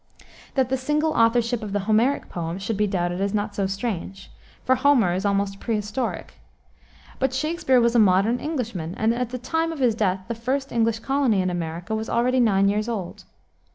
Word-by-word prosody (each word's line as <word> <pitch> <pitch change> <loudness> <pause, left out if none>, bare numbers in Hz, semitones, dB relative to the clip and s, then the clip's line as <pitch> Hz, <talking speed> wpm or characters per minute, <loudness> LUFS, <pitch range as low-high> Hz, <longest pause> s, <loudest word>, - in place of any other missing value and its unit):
That 260 -2 +2
the 265 - +1
single 300 +4 0
authorship 230 0 +2
of 210 -2 -6
the 205 - 0
Homeric 220 +7 +1
poems 170 +2 -5
should 220 +2 -2
be 210 +1 +1
doubted 175 -1 -1
is 200 +1 0
not 205 0 -2
so 200 -1 -1
strange, 195 -1 -5 0.3
for 260 - +3
Homer 255 -8 +3
is 190 +3 -2
almost 200 0 -1
prehistoric. 220 +2 -3 0.8
But 260 -1 0
Shakspere 305 -3 +2
was 235 0 +3
a 240 - +4
modern 205 +4 +3
Englishman, 230 - -4
and 220 +1 +2
at 245 0 -2
the 250 - -4
time 325 +7 -1
of 325 - -6
his 250 -4 +2
death 195 -3 0
the 235 - -2
first 265 +4 -2
English 230 -1 +1
colony 270 -6 +1
in 185 -1 0
America 175 +3 -4
was 220 +1 -3
already 250 +2 +2
nine 200 -5 +3
years 210 +3 0
old. 195 -7 -5
225 Hz, 190 wpm, -24 LUFS, 195-250 Hz, 0.8 s, a